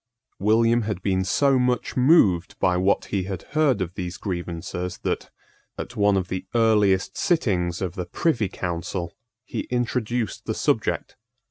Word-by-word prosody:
William 115 +3 +3
had 105 -4 -4
been 95 -1 +1
so 135 +8 +3
much 125 -1 0
moved 125 - +4
by 90 - +2
what 95 +2 +2
he 95 -2 0
had 95 -3 -5
heard 145 -9 +3
of 90 -1 -3
these 90 -2 -5
grievances 90 -1 -4
that, - - -2 0.5
at 120 - -6
one 100 -2 +3
of 90 -2 -1
the 95 0 -4
earliest 105 -5 +3
sittings 95 - 0
of 90 -2 -3
the 90 -1 -5
Privy 120 - 0
Council, 85 -1 -4 0.3
he - - -4
introduced 120 -3 -1
the - - -1
subject. - - -1
100 Hz, 150 wpm, -24 LUFS, 90-120 Hz, 0.5 s, moved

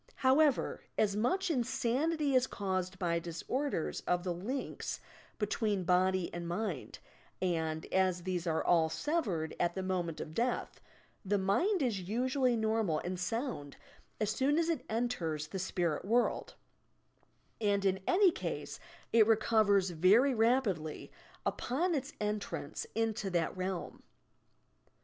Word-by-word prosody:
However, 275 +1 +3 0.2
as 205 -2 +2
much 360 - +1
insanity 275 +4 0
is 255 0 +4
caused 190 -1 -2
by 170 -3 0
disorders 175 - -2
of 180 0 +1
the 180 -2 -1
links 225 +11 -4 0.4
between 210 -2 0
body 185 +1 +2
and 175 0 -4
mind, 175 - -3 0.4
and, 160 -3 -1
as 185 -2 +2
these 180 -1 -2
are 160 -1 +1
all 165 -2 +4
severed 195 - -1
at 175 0 +1
the 190 - -2
moment 175 -4 -2
of 155 - -6
death, 240 +7 -1 0.4
the 205 0 +1
mind 290 - +2
is 220 -7 0
usually 255 +2 +1
normal 220 -7 +1
and 180 0 -3
sound 180 - -3 0.4
as 215 -1 +1
soon 270 +7 +2
as 335 0 +2
it 330 - -1
enters 170 -10 -1
the 190 - -4
spirit 175 -4 -1
world, 235 +5 +1 1.1
and 200 -2 +2
in 190 0 +2
any 370 -1 +5
ease - - -4 0.3
it 225 -2 +6
recovers 215 -4 +3
very 200 - +5
rapidly 220 - +1 0.3
upon 335 +9 0
its 280 -1 -2
en 210 0 0
trance 460 - -5
into 220 -3 0
that 175 -1 0
realm. 185 0 -4
205 Hz, 135 wpm, -33 LUFS, 180-250 Hz, 1.1 s, it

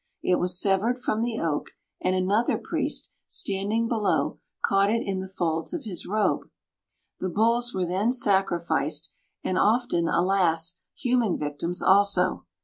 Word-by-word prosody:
It 180 - +2
was 180 0 +2
severed 200 +6 +2
from 225 -3 -1
the 230 -1 -1
oak, 155 -3 -2 0.3
and 185 0 +1
another 200 +6 +1
priest, - - -2 0.2
standing 205 +4 -1
below, 225 -3 0 0.3
caught 195 0 +3
it 230 +2 +1
in 195 -1 -2
the 190 - -5
folds 170 - -2
of 320 - -5
his 190 -8 -4
robe. 215 +2 0 0.7
The 185 - -2
bulls 230 +5 +2
were 185 -1 0
then 190 +7 +1
sacrificed, 175 - +1 0.3
and 185 - 0
often, 215 -6 +2
alas, 175 -2 +1 0.2
human 245 -6 +1
victims 150 +4 -3
also. 190 - +3
195 Hz, 140 wpm, -26 LUFS, 175-220 Hz, 0.7 s, caught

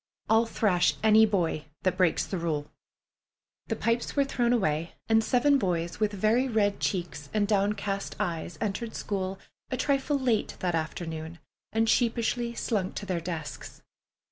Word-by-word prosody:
I'll 225 +1 +5
thrash 185 -6 +2
any 220 0 +7
boy 170 -7 0 0.2
that 185 -1 +2
breaks 180 -3 +2
the 190 - -3
rule." 150 -3 -2 1.0
The 225 - -1
pipes 230 +2 -1
were 280 - +4
thrown 240 -3 +1
away, 170 -8 0
and 225 0 +4
seven 275 +5 +3
boys 175 -4 -1
with 215 -1 +2
very 215 +6 +2
red 210 -4 +1
cheeks 170 -6 -2
and 205 -1 +2
downcast 200 -1 0
eyes 170 -4 -3
entered 220 +2 -3
school 195 -1 -3 0.3
a 255 - -2
trifle 280 +1 +1
late 245 -5 0
that 165 -3 -1
noon 160 +1 -6 0.3
and 225 +1 +2
sheepishly 235 0 +1
slunk 200 -7 -1
to 205 - -4
their 180 -3 -2
desks. 165 -3 -6
205 Hz, 150 wpm, -28 LUFS, 175-230 Hz, 1.0 s, any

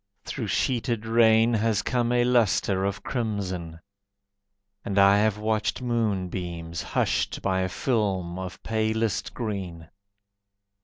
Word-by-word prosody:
Through - - -4
sheeted 115 -3 0
rain 115 0 +4
Has 110 -1 +1
come 120 -2 0
a 120 0 +3
lustre 110 -5 +2
of 100 -1 -3
crimson, 95 -9 -3 1.0
And 100 - -3
I 100 +1 +6
have 105 -1 +2
watched 110 0 -1
moonbeams 90 -8 -2
Hushed - - -1
by 95 -1 +1
a 95 - -1
film 95 -7 -1
of 95 -1 -7
palest 110 -1 -1
green. 95 -8 -5
105 Hz, 115 wpm, -26 LUFS, 95-115 Hz, 1.0 s, I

